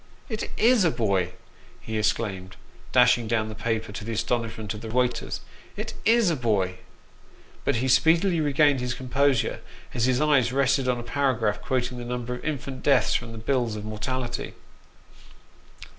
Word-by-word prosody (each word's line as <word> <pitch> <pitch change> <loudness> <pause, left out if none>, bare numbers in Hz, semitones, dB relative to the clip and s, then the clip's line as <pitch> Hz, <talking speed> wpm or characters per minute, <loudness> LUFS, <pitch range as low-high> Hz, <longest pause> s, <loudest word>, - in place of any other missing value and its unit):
"It 220 -2 -3
is 235 -2 +5
a 170 - +4
boy!" 95 - 0 0.5
he 110 - -6
exclaimed, 100 -3 -1 0.4
dashing 120 -2 +4
down 110 -1 0
the - - -6
paper, 110 0 -2
to 105 - -6
the 115 +2 -4
astonishment 110 -2 -2
of 105 - -8
the 115 - -7
waiters. 120 +1 -1 0.2
" - - -24
It - - -4
is 225 -5 +4
a - - +1
boy! 100 -8 0 0.4
" - - -27
But - - +2
he 125 +3 0
speedily 160 +7 +4
re 145 -1 +1
gained 145 -1 +4
his 125 -1 -2
composure 130 +1 +1 0.3
as 120 - +1
his 130 -1 +2
eye 150 -3 +4
rested 135 0 +2
on 125 -1 +1
a - - -6
paragraph 120 -4 0
quoting 125 -1 -2
the 120 - -6
number 125 0 -3
of 125 - -7
infant 135 -3 -4
deaths 140 - +3
from 120 -1 -2
the 115 - -8
bills 120 -1 0
of 105 0 -6
mortality. 120 +3 -4
125 Hz, 175 wpm, -25 LUFS, 110-135 Hz, 0.5 s, is